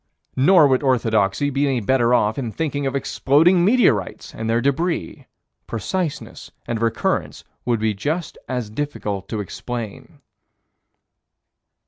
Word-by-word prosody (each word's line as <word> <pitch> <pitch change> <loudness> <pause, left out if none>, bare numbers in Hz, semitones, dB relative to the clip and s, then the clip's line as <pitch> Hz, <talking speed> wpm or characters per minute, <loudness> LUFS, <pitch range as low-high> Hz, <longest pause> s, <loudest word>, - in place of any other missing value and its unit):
Nor 155 +3 +6
would 130 -2 +2
orthodoxy 115 -1 +1
be 140 +1 +1
any 130 -3 +1
better 120 +2 +2
off 110 -1 +2
in 120 -4 -3
thinking 145 0 -2
of 135 - -3
exploding 160 +6 +3
meteorites 195 - +2
and 115 0 -4
their 115 +1 +2
débris: 140 - -2 0.4
preciseness 155 - -4 0.2
and 115 -1 -3
recurrence 115 -1 -1 0.2
would 120 -2 +1
be 110 0 0
just 150 - -3
as 125 -5 -3
difficult 105 -7 -4
to 110 - -3
explain. 110 +2 -7
130 Hz, 125 wpm, -21 LUFS, 110-145 Hz, 0.4 s, Nor